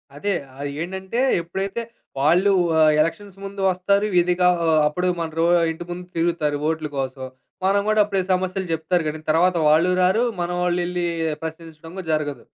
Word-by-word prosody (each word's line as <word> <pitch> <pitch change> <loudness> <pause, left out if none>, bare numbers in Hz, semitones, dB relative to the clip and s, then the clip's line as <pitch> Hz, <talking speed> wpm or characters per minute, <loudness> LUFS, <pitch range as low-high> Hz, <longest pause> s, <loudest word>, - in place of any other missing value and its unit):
అదే 200 +8 -2 0.2
ఆహ్, 140 +1 -5
ఏంటంటే 190 +6 -4 0.2
ఎప్పుడైతే 195 +6 -4 0.4
వాళ్ళు 175 +8 +4 0.3
ఆ - - +4 0.2
ఎలక్షన్స్ 190 +5 -3
ముందు 200 0 -6
వస్తారు 200 +3 +1
విదిగా 180 +1 +3 0.2
ఆహ్, 160 -1 +4
అప్పుడు 180 +5 -1
మన 165 -1 -2
రో 165 - +3 0.3
ఇంటి 160 +2 -7
ముందు 180 +1 -6
తిరుగుతారు 165 -3 0
వోట్లు 160 -1 -1
కోసం. 130 0 -3 0.4
మనం 200 +1 +3
గూడా 215 0 +4
అప్పుడే 200 -2 -1
సమస్యలు 185 0 -2
జెప్తారు 165 +2 0
గాని 155 +1 -4
తర్వాత 175 +3 +3
వాళ్ళు 160 +4 +4
రారు 190 +6 +3 0.2
మనవాళ్ళేళ్లి 175 0 -1 0.4
ప్రశ్నించడం 160 0 -8
గూడా 185 -3 -7
జరగదు. 145 -5 -2
175 Hz, 155 wpm, -22 LUFS, 160-190 Hz, 0.4 s, వాళ్ళు